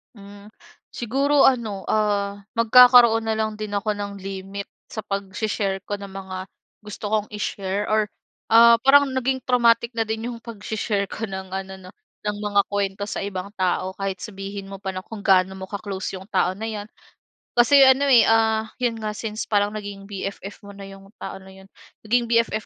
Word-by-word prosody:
Hmm, 200 0 -13 0.5
siguro 275 +5 +1
ano, 220 -8 +2
ah, 205 -2 0 0.2
magkakaroon 235 0 +7
na 220 - 0
lang 215 -1 -2
din 210 -1 -5
ako 205 +1 -1
ng 200 0 -5
limit 195 +1 -6 0.2
sa 220 - -6
pagse-share 195 -1 -3
ko 205 - -1
ng 200 - -8
mga 190 -1 -7 0.4
gusto 210 0 -6
kong 215 0 -1
i-share 200 -1 -3
or, 215 0 +2 0.5
ah, 230 0 +8
parang 285 0 +6
naging 260 0 -1
traumatic 235 -2 +3
na 225 - +1
din 220 +2 -3
'yung 235 - -6
pagse-share 215 -3 -3
ko 225 - -4
ng 190 -2 -7
ano 190 0 -5
'no, 185 - -12 0.4
ng 210 - -3
mga 205 -1 +3
kuwento 200 0 -2
sa - - -3
ibang 195 -1 -5
tao 185 0 -1
kahit 195 -1 -4
sabihin 195 -1 -7
mo 195 - -7
pa 190 0 -5
na 185 - -5
kung 210 +1 -10
gaano 190 -1 +3
mo 190 - -6
ka-close 195 -1 -5
'yung 190 +2 -9
tao 185 -3 +1
na 220 +4 -5
'yan. 210 -1 -6 0.7
Kasi 270 +3 +6
ano, 270 +2 +4
eh, 245 -3 +7
ah, 220 -1 +3 0.2
'yon 235 -2 0
nga, 215 -1 -4
since 215 0 -5
parang 205 -1 +1
naging 200 -1 -8
BFF 195 0 -6
mo 200 - -10
na 195 0 -10
'yong 195 +1 -14
tao - - -6
na 190 0 -14
'yon 190 0 -16 0.3
naging 235 +3 +1
BFF 230 -2 +1
205 Hz, 185 wpm, -23 LUFS, 195-225 Hz, 0.7 s, ah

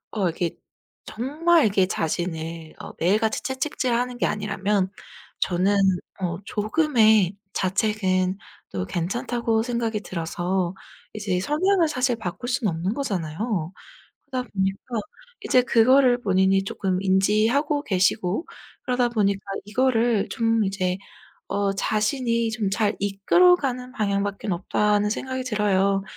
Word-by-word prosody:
어 195 -5 +1
이게 170 +1 -2 0.5
정말 310 +8 +2
이게 195 -2 +3
자신을 165 -1 -3
어 - - -8
매일같이 215 +6 +1
채찍질하는 250 -2 -1
게 - - +2
아니라면 200 -2 -1 0.5
저는 185 +3 +1 0.5
어 170 -2 -1
조금의 215 - +3 0.2
자책은 190 -1 0 0.3
또 90 -2 -3
괜찮다고 230 - -1
생각이 230 -3 -1
들어서 175 +1 -2 0.4
이제 205 -4 -1
성향을 335 - +2
사실 255 -3 +1
바꿀 220 +3 -6
수는 245 -7 0
없는 170 +5 -2
거잖아요. 190 - -3 0.5
그러다 255 -4 -4
보니까 195 +5 -2 0.5
이제 250 - +5
그거를 250 +1 +4
본인이 190 -1 +3
쪼끔 190 -2 -1
인지하고 215 +10 +2
계시고 190 - +1 0.4
그러다 250 -1 +1
보니까 200 -4 +1 0.3
이거를 230 -2 +1
좀 225 -1 +1
이제 185 -1 -1 0.5
어 200 0 0
자신이 230 +3 0
좀 220 -3 -1
잘 205 +1 +1
이끌어 205 - +4
가는 255 -5 -3
방향밖에는 200 -3 -1
없다는 210 +3 +1
생각이 260 +3 -3
들어요. 200 -4 +1
210 Hz, 280 characters per minute, -24 LUFS, 190-245 Hz, 0.5 s, 이제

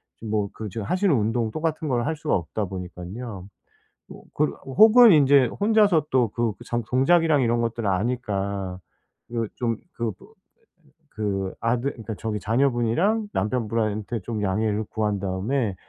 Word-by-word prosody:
지금 110 -1 -8
뭐 105 -2 0
그 110 -2 -6
지금 105 +1 -5
하시는 185 - +2
운동 115 -1 0
똑같은 155 +2 -2
걸 120 -2 0
할 160 - -1
수가 155 0 -1
없다 100 +4 -2
보니깐요. 95 +3 -7 0.6
뭐 - - -12
그 150 0 +1
혹은 220 - +7
인제 140 -3 +5
혼자서 205 - +3
또 125 -3 +3
그 115 0 -1
전 120 0 -1
동작이랑 155 +3 +3
이런 120 0 +1
것들을 115 -2 -2
아니까. 100 -3 -2 0.5
그 115 -2 -2
좀 115 -2 -1 0.2
그 115 -3 -2
뭐 - - -16 0.9
그 95 -3 -2
아들 120 +4 0
그러니까 110 -2 -7
저기 110 -2 -3
자녀분이랑 135 - +1
남편분한테 110 0 -1
좀 110 +1 -4
양해를 105 +2 0
구한 105 -2 -1
다음에 100 +4 -1
115 Hz, 300 characters per minute, -24 LUFS, 105-135 Hz, 0.9 s, 혹은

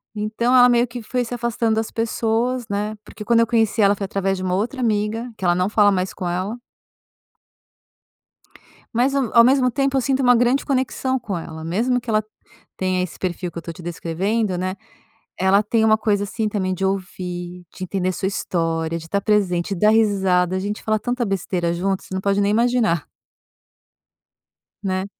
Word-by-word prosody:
Então, 215 +4 0
ela 250 -1 +8
meio 240 0 +4
que 240 +1 -7
foi 245 +3 -1
se 240 - -6
afastando 235 -1 0
das 220 0 -2
pessoas, 230 +2 -1
né, 210 +2 -2
porque 210 - -10
quando 230 +1 +4
eu 230 - +2
conheci 225 -1 +2
ela 200 0 +5
foi 200 - -4
através 195 0 -1
de 185 - -5
uma 180 -1 0
outra 235 +8 -2
amiga, 225 0 -1
que - - -10
ela 175 -1 +3
não 180 +1 +1
fala 205 -1 +4
mais 185 -1 -1
com 180 - -4
ela. 185 +7 -2 2.4
Mas, 260 +4 +2
hum, 265 -5 0
ao 235 - +8
mesmo 255 0 +4
tempo 275 0 0
eu - - +2
sinto 270 +1 0
uma 245 -1 +5
grande 245 +3 +2
conexão 260 -1 0
com 205 -6 -4
ela, 160 -1 -7
mesmo 230 +10 0
que 240 - -20
ela 215 0 +2 0.5
tenha 185 -1 0
esse 180 -3 -5
perfil 180 -1 -3
que 170 - -10
eu - - -4
tô 170 - -7
te 175 - -12
descrevendo, 185 +5 -1
né. 185 +1 -2 0.6
Ela 190 +2 +4
tem 220 +1 +1
uma 215 0 +5
coisa, 205 -2 +1
assim, 215 +2 -2
também 185 -3 -1
de 190 - -3
ouvir, 180 -2 -4
de 185 - -5
entender 185 0 -2
a - - -2
sua 190 - -3
história, 165 -3 -1
de 160 - -10
estar 200 +4 -1
presente, 200 -4 +1
de 170 - -7
dar 210 - +5
risada, 190 -4 +2
a - - 0
gente 205 +2 -4
fala 215 0 +1
tanta 245 +2 -2
besteira 180 -3 -1
juntas, 190 +2 -2
você - - -7
não 190 - -1
pode 200 +1 +1
nem 200 0 +2
imaginar. 225 - +2 1.8
Né. 185 0 -1
205 Hz, 200 wpm, -21 LUFS, 185-235 Hz, 2.4 s, ela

